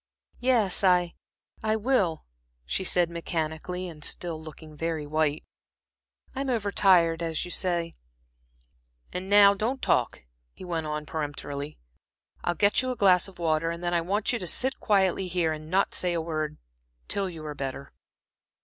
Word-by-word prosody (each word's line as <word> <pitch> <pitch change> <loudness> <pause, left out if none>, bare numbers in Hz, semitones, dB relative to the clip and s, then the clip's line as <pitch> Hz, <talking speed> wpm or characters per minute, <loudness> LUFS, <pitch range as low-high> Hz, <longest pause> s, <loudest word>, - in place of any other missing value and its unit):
"Yes, 235 -7 +2
I 180 -2 +4 0.5
I 220 0 +1
will," 210 - +1 0.4
she 190 - -2
said, 175 -1 +3
mechanically, 170 +2 -3
and 155 -3 -10
still 165 -2 -3
looking 155 0 -11
very 160 -1 -2
white. 155 0 0 0.9
"I'm 270 0 -3
over 215 -5 0
tired, 170 -5 +4
as 165 -1 -1
you 175 - -8
say." 170 -3 0 1.2
"And 185 +1 -4
now 200 0 +8
don't 225 +7 -2
talk," - - +1 0.3
he - - -11
went 165 -3 -2
on, 150 0 -3
peremptorily. 145 -1 -5 0.7
"I'll 175 - 0
get 205 +7 +3
you 255 - -3
a 255 - -2
glass 185 -5 +4
of 195 - -14
water, 165 -1 +1
and 170 +1 -5
then 175 0 0
I 170 - +2
want 200 +7 0
you 240 - -1
to 180 - -4
sit 260 - +1
quietly 190 -2 +2
here, 170 -3 0
and 155 0 -8
not 190 +3 +2
say 180 -1 +1
a 170 - 0
word, 155 -2 -3 0.5
till 195 -2 0
you 160 -3 -9
are 150 - -4
better." 140 0 -6
175 Hz, 165 wpm, -27 LUFS, 160-195 Hz, 1.2 s, now